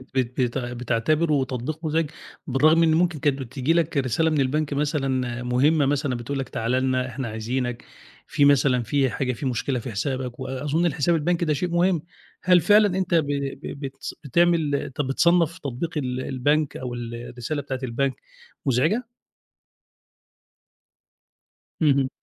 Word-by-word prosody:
بيتع 125 -1 -1
بتعتبره 135 +5 +1
تطبيق 135 +6 -5
مُزعج 155 -1 0 0.4
بالرغم 155 +5 +4
إن 160 -1 +4
ممكن 170 -2 +1
كانت 140 -1 +1
بتيجي 135 +4 -1
لك 165 -3 +1
رسالة 135 +5 +1
من 150 -3 +1
البنك 145 +2 0
مثلًا 135 -4 -1
مُهمّة 140 +5 +3
مثلًا 140 -2 0
بتقول 135 +4 -4
لك 130 - -4
تعالَ 115 +2 -2
لنا، 130 0 +1
إحنا 130 0 -5
عايزينك، 120 +2 -3 0.4
في 145 - +2
مثلًا 135 -3 +4
في 135 +2 +1
حاجة 125 +4 -2
في 135 - -6
مشكلة 125 +1 -1
في 120 +1 -6
حسابك 125 +3 -3
وأظُن 145 +6 -1
الحسابات 165 +1 +1
البنكي 170 +1 +1
ده 155 - +2
شيء 175 +5 -2
مهم، 175 -1 +2 0.4
هل 180 -2 +5
فعلًا 205 -3 +4
أنت 185 -2 -1
ب 160 -3 +3
ب 140 -1 -3
ب 140 - -7
بتس 135 0 -7
بتعمل 160 0 +2
أنت 140 0 -3
بتصنّف 165 +4 +2
تطبيق 145 +5 -4
ال 130 -2 -2
البنك 145 +3 0
أو 125 -1 -5
ال 120 -1 -5
الرسالة 120 +5 -5
بتاعة 130 -2 -4
البنك 130 +2 0 0.5
مُزعجة؟ 160 - +1 2.7
اهم. 140 -3 +3
140 Hz, 150 wpm, -24 LUFS, 125-155 Hz, 2.7 s, هل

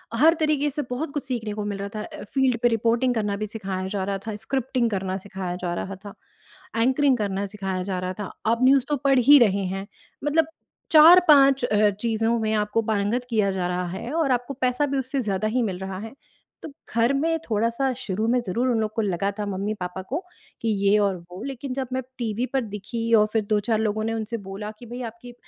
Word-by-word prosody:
हर 310 +7 +6
तरीके 300 -2 +1
से 295 +1 -3
बहुत 280 +5 -3
कुछ 290 - -2
सीखने 235 -5 -3
को 210 0 -4
मिल 205 -1 -3
रहा 200 0 -4
था। 215 - -3
अ, - - -9
फील्ड 265 -3 +2
पे 240 - +5
रिपोर्टिंग 235 +2 +2
करना 210 -2 0
भी 215 - -3
सिखाया 195 -3 -4
जा 195 -1 -2
रहा 195 +1 -2
था, 215 - -3
स्क्रिप्टिंग 240 +3 -1
करना 190 -2 -2
सिखाया 190 -3 -4
जा 175 -1 -1
रहा 195 +2 -4
था, 200 - -8 0.7
एंकरिंग 265 +1 +3
करना 200 -2 -2
सिखाया 190 -2 -3
जा 185 -1 -3
रहा 185 0 -3
था। 205 - -4 0.2
आप 230 +1 +2
न्यूज़ 265 0 +5
तो 295 - +1
पढ़ 270 -2 +5
ही 285 +4 +8
रहे 200 -4 +3
हैं, 195 +1 -5 0.4
मतलब 300 +2 +2 0.4
4-5 305 -5 +7
अ, 210 -2 +3
चीज़ों 225 +3 0
में 220 -1 0
आपको 210 +1 +1
पारंगत 215 +4 0
किया 210 -4 +2
जा 185 -2 -1
रहा 180 0 -2
है 190 +8 -5
और 315 -5 +1
आपको 245 +2 -1
पैसा 255 +3 +2
भी 275 - -1
उससे 265 +1 -1
ज़्यादा 205 -2 -1
ही 245 +4 0
मिल 190 -5 -3
रहा 190 0 -5
है, 225 +1 -8 0.5
तो - - -6 0.3
घर 230 +2 +3
में 325 +4 +1
थोड़ा-सा 230 +5 +1
शुरू 210 +3 -2
में 245 +2 +3
ज़रूर 235 +8 0
उन 235 -2 +2
लोग 215 - -1
को 225 - +1
लगा 200 -1 0
था 210 - -1
मम्मी-पापा 195 -2 -3
को 295 - -1 0.4
कि 230 - -2 0.2
ये 200 +1 +5
और 200 -2 +2 0.2
वो। 185 - -8
लेकिन 270 -1 -5
जब 265 -1 -3
मैं 260 - 0 0.2
टीवी 235 -1 -1
पर 270 - +2
दिखी 230 +3 -3
और 210 -1 +5
फिर 220 - +3
2-4 215 +1 +1
लोगों 215 0 0
ने 225 +1 -1
उनसे 225 +1 -3
बोला 210 +2 -5
कि 245 - -11
भई 240 +2 -7
आपकी, 240 +2 -13
225 Hz, 220 wpm, -24 LUFS, 200-255 Hz, 0.7 s, ही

